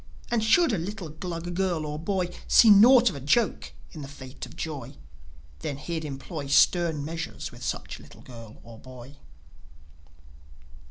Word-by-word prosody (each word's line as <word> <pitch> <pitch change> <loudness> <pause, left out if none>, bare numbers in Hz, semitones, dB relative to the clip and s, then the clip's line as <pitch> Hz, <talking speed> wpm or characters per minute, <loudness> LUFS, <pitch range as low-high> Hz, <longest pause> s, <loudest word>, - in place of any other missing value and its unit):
And 235 -2 +1
should 295 +6 +4
a 195 - 0
little 185 0 -6
Glug 170 +2 -6
girl 175 -4 -1
or 150 0 -5
boy 180 0 -2
See 225 - +7
naught 235 +3 +7
of - - -9
a - - -6
joke 205 - 0 0.2
in 155 - -9
the 140 - -7
fate 130 -1 -10
of - - -15
Joi, 140 -4 -6 0.6
Then 135 - -5
he'd 160 +2 -5
employ 145 +1 -6
Stern 160 +1 +3
measures 165 +1 -6
with - - -14
such - - -5
little - - -16
girl 115 -3 -13
or 115 -1 -13
boy. 130 +2 -13
160 Hz, 160 wpm, -26 LUFS, 140-190 Hz, 0.6 s, See